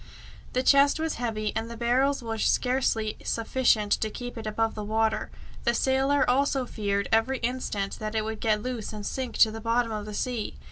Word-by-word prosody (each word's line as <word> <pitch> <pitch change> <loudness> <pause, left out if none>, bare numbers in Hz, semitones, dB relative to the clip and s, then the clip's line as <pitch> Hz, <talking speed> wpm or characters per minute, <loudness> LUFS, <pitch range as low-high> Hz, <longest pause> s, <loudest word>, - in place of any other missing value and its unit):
The 255 - +1
chest 280 +2 +5
was 320 0 -1
heavy, 215 -3 -2
and 225 +1 -2
the 235 - -7
barrels 255 +3 +1
were 225 -1 -4
scarcely 250 -4 +1
sufficient 230 -3 +1
to 220 - 0
keep 245 +3 -7
it 225 -2 -6
above 225 +1 0
water. 220 +1 0 0.3
The 235 -1 +2
sailor 270 +3 +2
also 270 +1 +2
feared 200 -4 -1
every 225 +4 +2
instant 230 -5 -2
that 215 0 -4
it 215 -1 0
would 220 0 -4
get 215 -2 +1
loose 245 -4 -4
and 210 -1 -6
sink 260 +2 -3
to 220 - +6
the 225 0 -7
bottom 230 +1 +1
of 210 -1 -4
the 210 - -6
sea. 240 -3 -2
230 Hz, 190 wpm, -27 LUFS, 215-255 Hz, 0.3 s, to